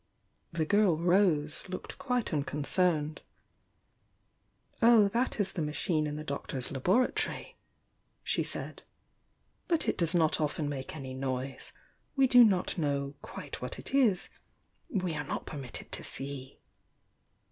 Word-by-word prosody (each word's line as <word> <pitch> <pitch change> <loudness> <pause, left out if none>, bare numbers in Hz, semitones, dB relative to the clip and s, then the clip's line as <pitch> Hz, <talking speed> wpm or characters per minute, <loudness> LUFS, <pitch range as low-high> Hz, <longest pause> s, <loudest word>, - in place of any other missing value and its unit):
The 165 -1 -1
girl 205 -2 +4
Rose 170 -3 +2
looked 185 - -6
quite 250 -7 -1
un 150 - +2
concerned. 150 +1 0 1.6
"Oh, 225 -3 +7
that 235 +3 0
is 205 - 0
the 175 - -2
machine 155 +1 0
in 150 - -4
the 155 - -5
Doctor's 140 -3 -4
labora 185 - +2
tory," - - -3 0.7
she - - 0
said. - - -5 0.9
"But 335 -2 +2
it - - 0
does 170 0 +1
not 160 -2 +3
often 150 0 -1
make 140 0 -5
any 135 -3 -6
noise. 130 0 -4 0.4
We 270 -1 +5
do 245 -1 +8
not 190 -4 +2
know 140 -2 -1
quite - - -8
what - - -4
it - - -8
is, 230 -9 +3 0.3
— - - -42
we 185 -5 -1
are 150 -1 -2
not 140 - -4
permitted 135 -5 -6
to - - -4
see!" 135 -1 -6
160 Hz, 145 wpm, -31 LUFS, 140-200 Hz, 1.6 s, do